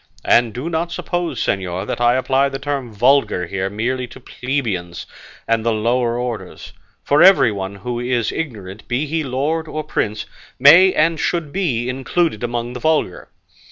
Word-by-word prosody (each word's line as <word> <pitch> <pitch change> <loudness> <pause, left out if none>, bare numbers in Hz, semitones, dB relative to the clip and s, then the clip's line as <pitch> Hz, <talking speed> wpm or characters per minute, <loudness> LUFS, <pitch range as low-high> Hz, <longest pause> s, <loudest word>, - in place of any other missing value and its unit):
And 120 -1 +4
do 125 +8 -5
not 170 0 -2
suppose, 175 -8 -3
señor, 95 -1 -2
that - - -4
I 120 +1 +4
apply 135 +1 +1
the 135 - -4
term 135 -3 -4
vulgar 120 -4 +2
here 95 +2 -3
merely 120 +5 -2
to 125 - -13
plebeians 115 -11 -4 0.4
and 115 -1 +1
the 115 - +1
lower 120 +2 0
orders; 120 -2 -6 0.3
for 145 +2 +3
everyone 105 - +4
who 120 +4 -5
is 120 -2 -1
ignorant, 110 - -6
be 130 +5 -1
he 160 +2 -2
lord 150 +5 -2
or 155 0 -4
prince, 105 -8 -2 0.3
may 170 +8 +7
and 165 -1 +1
should 165 -4 -2
be 135 -12 -1
included 135 0 -1
among 120 0 -3
the 125 - -6
vulgar. 155 - -1
125 Hz, 160 wpm, -19 LUFS, 110-150 Hz, 0.4 s, may